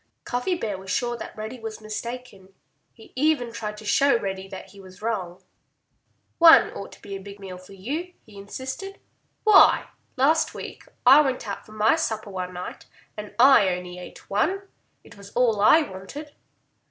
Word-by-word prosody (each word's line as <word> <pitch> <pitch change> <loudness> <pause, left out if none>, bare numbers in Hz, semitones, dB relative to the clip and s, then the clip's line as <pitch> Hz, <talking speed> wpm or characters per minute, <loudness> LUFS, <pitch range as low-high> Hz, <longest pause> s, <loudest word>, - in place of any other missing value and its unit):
Cuffy 250 +9 -1
Bear 210 - -4
was 190 0 -11
sure 240 +6 0
that - - -9
Reddy 220 +4 -6
was 220 -1 -7
mistaken. 215 -3 -7 0.4
He 225 - -18
even 260 -4 +1
tried 210 -2 -5
to 215 - -11
show 275 +6 +4
Reddy 195 -1 -4
that 190 -1 -9
he 200 - -16
was 185 -1 -14
wrong. 195 -6 -4 1.0
"One 330 -1 +8
ought 200 - -8
to - - -17
be 200 -1 -6
a 195 - -7
big 200 +1 -11
meal 185 -2 -8
for 185 +2 -15
you," 295 - -5
he 215 - -17
insisted. 260 - -7 0.4
"Why, 425 -3 +6 0.3
last 305 +5 +2
week - - -8 0.2
I 270 +4 +9
went 260 -5 -2
out 200 - -6
for 215 - -14
my 215 +4 +3
supper 220 -9 -3
one 185 -1 -4
night 180 - -8 0.3
and 210 -1 -8
I 250 -6 +7
ate 180 - -1
only 180 0 -9
one. 205 +10 +2
And 390 +1 -5 0.4
it - - -16
was 200 0 -12
all 230 -4 +2
I 310 +10 +6
wanted." 285 +8 -9
215 Hz, 180 wpm, -24 LUFS, 195-260 Hz, 1.0 s, I